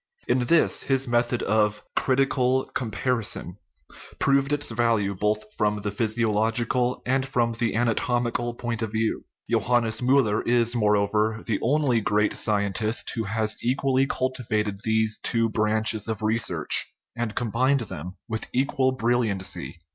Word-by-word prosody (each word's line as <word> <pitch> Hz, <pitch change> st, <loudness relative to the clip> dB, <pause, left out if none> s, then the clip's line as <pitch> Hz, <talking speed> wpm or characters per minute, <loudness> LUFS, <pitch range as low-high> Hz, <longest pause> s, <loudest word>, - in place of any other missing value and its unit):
In 125 Hz, 0 st, +2 dB
this 170 Hz, -1 st, +3 dB
his 135 Hz, -1 st, 0 dB
method 120 Hz, 0 st, +1 dB
of 105 Hz, 0 st, +1 dB
critical 130 Hz, -1 st, +2 dB
comparison 115 Hz, -5 st, -2 dB, 0.6 s
proved 140 Hz, 0 st, +2 dB
its 145 Hz, 0 st, 0 dB
value 115 Hz, -4 st, +1 dB
both 105 Hz, +2 st, 0 dB
from 105 Hz, 0 st, +1 dB
the 105 Hz, -, -2 dB
physiological 115 Hz, +3 st, 0 dB
and 130 Hz, +1 st, +1 dB
from 120 Hz, -3 st, 0 dB
the 115 Hz, -1 st, -1 dB
ana 115 Hz, 0 st, +2 dB
tomical 120 Hz, 0 st, -1 dB
point 120 Hz, -1 st, -3 dB
of 110 Hz, -2 st, -3 dB
view. 110 Hz, 0 st, -1 dB, 0.2 s
Johannes 120 Hz, -2 st, +1 dB
Miiller 125 Hz, -4 st, +3 dB
is, 120 Hz, 0 st, +2 dB
moreover, 105 Hz, 0 st, +1 dB
the 105 Hz, -4 st, -1 dB
only 130 Hz, -3 st, +2 dB
great 105 Hz, 0 st, +1 dB
scientist 105 Hz, +1 st, 0 dB
who 115 Hz, -2 st, -3 dB
has 110 Hz, +2 st, -1 dB
equally 135 Hz, +2 st, +1 dB
cultivated 110 Hz, -7 st, -2 dB
these 110 Hz, -1 st, +1 dB
two 115 Hz, -1 st, 0 dB
branches 110 Hz, 0 st, +1 dB
of 110 Hz, -1 st, -4 dB
research, 110 Hz, -8 st, +1 dB, 0.3 s
and 115 Hz, -3 st, -3 dB
combined 125 Hz, +4 st, +1 dB
them 90 Hz, -4 st, -7 dB
with 110 Hz, -1 st, -3 dB
equal 130 Hz, 0 st, +1 dB
brilliancy. 105 Hz, -8 st, -1 dB
115 Hz, 135 wpm, -25 LUFS, 105-125 Hz, 0.6 s, this